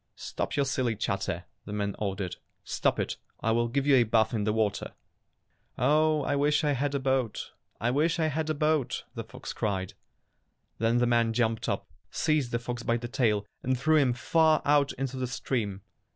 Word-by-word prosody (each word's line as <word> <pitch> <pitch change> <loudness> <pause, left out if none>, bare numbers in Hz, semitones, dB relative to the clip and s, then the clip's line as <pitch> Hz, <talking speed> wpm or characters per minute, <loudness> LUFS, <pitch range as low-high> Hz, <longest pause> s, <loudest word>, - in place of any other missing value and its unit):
"Stop - - -4
your 140 -1 +2
silly 130 -4 0
chatter!" 95 -4 -2 0.2
the 105 - -6
man 100 -1 -2
or 100 -2 -1
dered. 90 -3 -4 0.3
"Stop - - 0
it, - - -2 0.2
or - - -1
I - - +4
will 120 +1 +2
give 135 +3 -1
you 140 -2 +6
a 120 - +6
bath 110 +1 +2
in 105 -3 0
the 105 - +2
water!" 105 -2 -1 0.8
"Oh, 155 0 +3
I 145 - 0
wish 150 +2 +2
I 150 - +2
had 140 +1 0
a - - +1
boat, 130 -4 -1 0.3
I 120 +2 +1
wish 155 +6 +2
I 160 - +1
had 155 +1 -1
a 155 - +1
boat!" 150 -2 +1
the - - -5
fox - - -8
cried. 95 -3 -2 0.9
Then 115 +2 +2
the 120 - +3
man 115 -1 +2
jumped 115 -1 0
up, - - -2 0.2
seized 155 -6 +1
the 120 - +1
fox 120 0 -5
by 115 0 +1
the 120 0 -5
tail, 110 -4 +1 0.2
and 130 0 0
threw 155 +3 +4
him 135 -4 +4
far 160 +5 +3
out 145 -1 +4
into 135 0 -4
the 130 -1 -1
stream. 110 -6 -2
125 Hz, 205 wpm, -28 LUFS, 110-145 Hz, 0.9 s, you